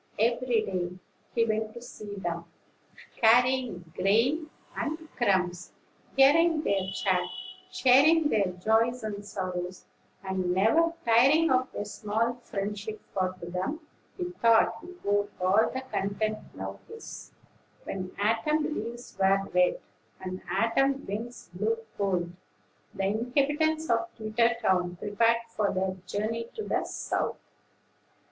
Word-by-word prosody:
Every 235 +1 +2
day 180 -2 -3 0.4
he 230 -1 +4
went 220 0 -1
to 235 - -8
see 210 -4 -8
them, 170 -3 -4 0.7
carrying 240 -7 +3
grain 255 - +2 0.3
and 315 +1 -3
crumbs, 185 -6 0 0.4
hearing 310 +3 +5
their 195 -5 0
chat, - - +1 0.4
sharing 295 +5 +5
their 205 -6 +2
joys 225 +6 +1
and 205 -1 -4
sorrows, 185 -3 -5 0.4
and 185 -2 -1
never 320 - +4
tiring 270 +8 +5
of 255 0 +2
their 205 - -4
small 220 +3 -1
friendship; 210 +1 -4
for 185 -1 0
to 170 - -7
them, 185 - -3 0.4
he 360 -1 -3
thought, 230 -6 +3
he 360 +1 -11
owed 205 0 +2
all 190 +4 +4
the 260 - -3
content 215 -3 -2 0.2
now - - -6
his. 450 0 -10 0.5
When 185 -1 -5
autumn 300 +9 +1
leaves 240 0 -6
were 195 0 +3
red, 180 0 +3 0.4
and 185 0 -6
autumn 270 +8 +2
winds 225 +3 -6
blew 215 +5 0 0.2
cold, 180 -4 0 0.6
the 195 - -2
inhabitants 285 +9 +1
of 345 - +2
Twittertown 215 -5 +1
prepared 230 +4 +2
for 210 -3 0
their 185 0 -1
journey 230 +3 -2
to 435 - -4
the - - -1
South. - - -2
220 Hz, 125 wpm, -28 LUFS, 195-255 Hz, 0.7 s, hearing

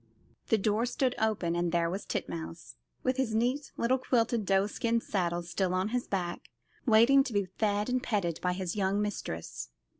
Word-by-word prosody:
The 225 - +4
door 215 +3 +1
stood 255 0 +1
open, 210 -6 +1
and 175 0 0
there 170 -1 +2
was 190 +4 -4
Titmouse, 85 -6 -5 0.3
with 255 0 +1
the 245 -5 0
neat 250 +6 0
little 255 +3 +2
quilted 230 -4 +1
doeskin 210 +5 +2
saddle 175 -5 -1
still 180 +2 -1
on 185 +3 0
his 245 +1 -1
back, 175 -3 -3 0.4
waiting 240 +5 +6
to 270 - -5
be 200 -1 +2
fed 205 +2 0
and 250 0 0
petted 175 -9 -1
by 180 0 +1
his 180 0 -3
young 200 0 +1
mistress. 135 - -4
205 Hz, 175 wpm, -30 LUFS, 180-235 Hz, 0.4 s, waiting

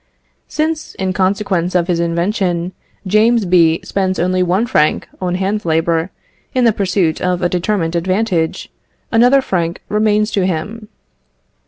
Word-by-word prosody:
Since, 310 0 -2
in 190 -1 -2
consequence 190 -2 0
of 175 -2 +3
his 175 -2 0
invention, 175 +1 -1 0.3
James 215 +3 +3
B. 170 -2 +3
spends 190 -1 -1
only 185 +1 +1
one 180 +5 +1
franc 155 -9 +1
on 180 -1 -1
hand 195 +3 -1
labour 165 +1 0 0.5
in 255 -1 +3
the 230 - +4
pursuit 185 -5 0
of 180 0 -1
a 175 - +2
determined 175 -2 -1
advantage, 185 -1 -1 0.4
another 245 +4 +5
franc 170 -5 -2
remains 210 0 +1
to 195 - 0
him. 205 +6 -4
185 Hz, 140 wpm, -16 LUFS, 170-210 Hz, 0.5 s, another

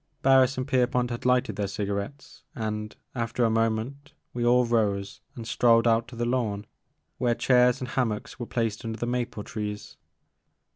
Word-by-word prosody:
Harris 135 0 +5
and 130 +1 -2
Pierpont 125 -2 +1
had 120 - -5
lighted 125 0 +2
their 100 -1 -1
cigarettes 100 +7 -5
and, 105 -3 -4 0.2
after 120 0 -1
a 115 - +2
moment, 115 +6 -1 0.2
we 120 - -2
all 125 +1 +4
rose 105 -4 0
and 115 -2 -7
strolled 115 -1 +4
out 115 0 +3
to 120 - -11
the 120 +1 -1
lawn, 115 -5 -1 0.5
where 120 -2 +2
chairs 125 -1 +4
and 125 - -5
hammocks 120 -3 -2
were 120 - -4
placed 115 -3 -2
under 115 -1 -4
the 120 - -2
maple 120 -3 -2
trees. 105 -1 -6
120 Hz, 165 wpm, -27 LUFS, 110-125 Hz, 0.5 s, Harris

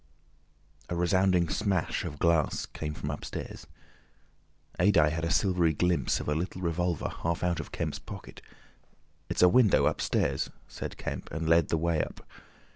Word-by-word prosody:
A 85 - -2
resounding 90 0 +3
smash 95 +2 -1
of 75 - -5
glass 85 -3 +2
came 75 -1 -6
from 75 - -4
upstairs. 75 - -7 1.1
Adye 80 -7 +4
had 80 0 -3
a 85 - 0
silvery 90 -4 +2
glimpse 90 +3 +1
of - - -6
a 75 - +1
little 90 +4 -3
revolver 85 -1 -1
half 85 +1 -1
out 85 -2 +1
of 80 - -7
Kemp's - - -3
pocket. - - -10 0.9
"It's - - +1
a - - +9
window, 110 +2 +5
upstairs!" 70 -1 0 0.2
said - - -7
Kemp, - - -5
and 80 +1 -3
led 85 -1 +4
the 80 - +2
way 85 -1 +1
up. - - -9
85 Hz, 155 wpm, -29 LUFS, 80-90 Hz, 1.1 s, a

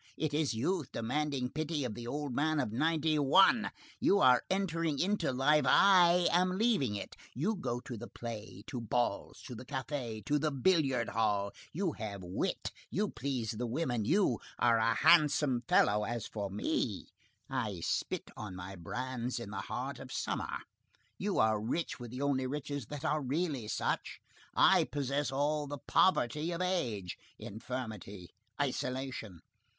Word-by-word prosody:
It 155 -1 -1
is 150 -5 +1
youth 150 +5 -1
demanding 135 +1 -1
pity 155 -2 -2
of 120 - -3
the 120 +2 -7
old 145 0 -3
man 155 +3 +1
of 125 -7 -1
ninety 155 +4 +1
one! 195 - +5 0.3
You 200 - +4
are 125 -10 +6
entering 165 -6 0
into 185 -4 +1
life, 135 +3 +3
I 180 -1 +6
am 185 +1 +2
leaving 205 - +2
it; 100 - -6 0.2
you 185 - 0
go 120 -10 -3
to 120 - -7
the 120 +3 -7
play, 110 -4 -7
to 125 -4 -5
balls, 115 -2 -1
to 125 - -8
the 120 - -8
café, 130 -4 -4
to 150 0 +2
the 155 +1 +1
billiard 135 -4 +2
hall; 105 -3 +1 0.2
you 175 +1 -1
have 100 -7 -6
wit, 90 +1 -2 0.2
you 205 +2 0
please 125 -4 -3
the 120 +2 -3
women, 120 -3 -1
you 160 - +2 0.2
are 115 -1 +4
a 115 0 +2
handsome 145 -6 +4
fellow; 105 +1 +4
as 120 +1 -3
for 100 -2 -4
me, 100 +2 -1 0.4
I - - -3
spit - - -2
on 105 -4 -7
my 90 +2 -7
brands 125 +7 -4
in 110 -4 -7
the 105 - -3
heart 125 +4 -4
of 130 -1 -9
summer; - - -3 0.6
you 200 0 -1
are 110 -1 +3
rich 150 +10 -2
with 120 -1 -7
the 125 +4 -4
only 130 -2 +1
riches 145 -2 -4
that 150 +1 -6
are 155 0 +1
really 140 -3 -1
such, - - -2 0.4
I - - +6
possess 140 0 -1
all 145 +2 0
the 145 +1 -5
poverty 150 -1 +2
of 170 - -4
age; 125 - -1 0.2
infirmity, 110 -4 -6 0.3
isolation! 130 - -3
130 Hz, 160 wpm, -33 LUFS, 115-155 Hz, 0.6 s, are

